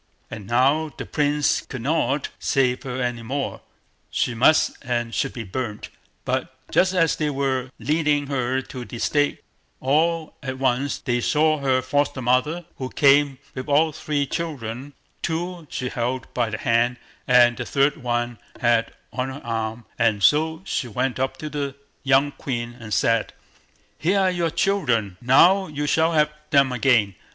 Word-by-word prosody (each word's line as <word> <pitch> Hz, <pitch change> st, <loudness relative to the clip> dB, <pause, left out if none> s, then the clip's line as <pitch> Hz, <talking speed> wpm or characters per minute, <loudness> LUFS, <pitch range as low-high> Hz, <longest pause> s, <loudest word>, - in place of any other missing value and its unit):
And 100 Hz, -3 st, -8 dB
now 140 Hz, +7 st, +2 dB
the -, -, -5 dB
Prince 145 Hz, 0 st, +1 dB
could 125 Hz, -3 st, -8 dB
not 145 Hz, -1 st, 0 dB
save 125 Hz, -2 st, +1 dB
her 130 Hz, -2 st, -5 dB
any 120 Hz, -2 st, -2 dB
longer. 135 Hz, +4 st, -3 dB, 0.5 s
She 120 Hz, -, 0 dB
must 130 Hz, +7 st, +4 dB
and 120 Hz, -1 st, -2 dB
should 135 Hz, -, 0 dB
be 120 Hz, -, -5 dB
burnt. 105 Hz, +1 st, -5 dB, 0.4 s
But -, -, -2 dB, 0.2 s
just 185 Hz, 0 st, +3 dB
as 165 Hz, -3 st, +3 dB
they 150 Hz, -, 0 dB
were 135 Hz, -2 st, -1 dB
leading 150 Hz, -1 st, +1 dB
her 130 Hz, -1 st, -1 dB
to 125 Hz, -2 st, -8 dB
the 120 Hz, -, -8 dB
stake, 145 Hz, +4 st, 0 dB, 0.4 s
all 160 Hz, +4 st, +1 dB
at 130 Hz, -2 st, -4 dB
once 130 Hz, +1 st, 0 dB
they 120 Hz, -3 st, -1 dB
saw 155 Hz, +2 st, +2 dB
her 130 Hz, -2 st, +1 dB
foster 145 Hz, +1 st, 0 dB
mother, 130 Hz, +8 st, +1 dB
who 130 Hz, -1 st, -3 dB
came 140 Hz, -1 st, +4 dB, 0.2 s
with 130 Hz, +2 st, -6 dB
all 155 Hz, +3 st, +4 dB
three 145 Hz, -1 st, -1 dB
children—two 160 Hz, +5 st, -5 dB
she 125 Hz, 0 st, -4 dB
led 125 Hz, +1 st, -3 dB
by 120 Hz, -2 st, 0 dB
the 110 Hz, -, -3 dB
hand, 120 Hz, +2 st, +1 dB, 0.3 s
and 120 Hz, -1 st, +6 dB
the -, -, -3 dB
third 140 Hz, +1 st, +2 dB
she 120 Hz, -3 st, -2 dB, 0.2 s
had 120 Hz, -2 st, +2 dB, 0.2 s
on 130 Hz, +1 st, -2 dB
her 135 Hz, +2 st, -8 dB
arm; 115 Hz, 0 st, -3 dB
and 110 Hz, -4 st, +2 dB
so 160 Hz, +3 st, +3 dB
she 125 Hz, -, -2 dB
went 125 Hz, +3 st, -2 dB
up 130 Hz, 0 st, -1 dB
to 155 Hz, -, -6 dB
the 140 Hz, -2 st, -3 dB, 0.3 s
young 135 Hz, +1 st, +3 dB
queen 120 Hz, -4 st, -4 dB
and 110 Hz, -2 st, -9 dB
said: 115 Hz, +1 st, +1 dB, 0.7 s
"Here 190 Hz, +5 st, +2 dB
are 190 Hz, -1 st, +3 dB
your 175 Hz, -2 st, 0 dB
children; 120 Hz, -, 0 dB
now 175 Hz, +10 st, +5 dB
you 150 Hz, -1 st, -3 dB
shall 160 Hz, +3 st, +2 dB
have 150 Hz, -1 st, +3 dB, 0.2 s
them 140 Hz, -2 st, +4 dB
again. 115 Hz, -5 st, +3 dB
135 Hz, 160 wpm, -23 LUFS, 120-150 Hz, 0.7 s, and